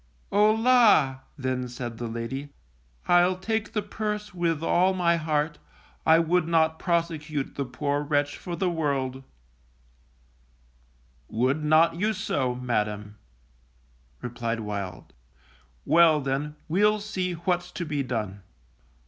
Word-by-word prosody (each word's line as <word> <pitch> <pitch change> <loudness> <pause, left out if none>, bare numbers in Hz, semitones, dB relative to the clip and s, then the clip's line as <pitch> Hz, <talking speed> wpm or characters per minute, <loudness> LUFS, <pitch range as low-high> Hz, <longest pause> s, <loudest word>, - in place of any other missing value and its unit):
O 210 +2 +5
la! 225 - +4 0.2
then 130 -2 -2
said 120 -2 -6
the 120 - -3
lady, 115 +5 -5 0.6
I'll 175 +1 +4
take 220 +3 -2
the 210 -3 -1
purse 210 -1 -4
with 165 -3 -1
all 185 +3 +3
my 170 -2 +2
heart; 155 -1 -1 0.5
I 160 0 +7
would 165 0 +2
not 160 -1 +2
prosecute 160 -5 -1
the 140 - -3
poor 140 +3 -2
wretch 145 -1 0
for 175 - -6
the 190 +1 0
world. 140 -6 -1 2.1
Would 130 +7 0
not 155 +2 +4
you 210 +4 +1
so, 140 - -1
Madam, 105 -4 -2 1.1
replied 120 -1 -3
Wild. 100 -3 -6 0.7
_Well, 160 -3 +5
then, 140 +3 -2
we'll 210 +6 +3
see 190 -3 -3
what's 175 +1 -1
to 175 - -4
be 150 -2 -1
done. 110 -7 -3
155 Hz, 125 wpm, -26 LUFS, 130-180 Hz, 2.1 s, I